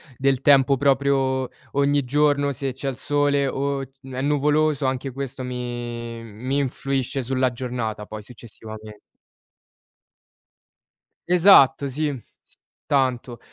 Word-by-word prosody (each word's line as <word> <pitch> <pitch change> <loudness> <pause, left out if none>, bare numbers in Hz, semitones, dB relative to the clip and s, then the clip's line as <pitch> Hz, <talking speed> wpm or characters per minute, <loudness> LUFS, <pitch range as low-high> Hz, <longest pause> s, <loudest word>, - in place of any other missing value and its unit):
del 135 0 +1
tempo 140 -1 +5
proprio 135 -1 +1 0.2
ogni 140 -1 +1
giorno 145 +1 +2
se 135 +1 -3
c'è 135 +2 -6
il 135 - -2
sole, 145 0 +1
o 140 +1 -2
n 135 0 -12
è 130 - -3
nuvoloso, 150 0 +1
anche 130 +1 -2
questo 135 0 -6
mi 120 -2 -5
mi 120 +6 -3
influisce 135 0 -2
sulla 130 0 0
giornata 120 -4 -4
poi 105 0 -8
successivamen 110 -2 -11 2.3
Esatto 170 -6 +6
sì. 150 +3 -2 0.3
S - - -17 0.3
tanto. 130 -4 0
135 Hz, 115 wpm, -23 LUFS, 125-140 Hz, 2.3 s, Esatto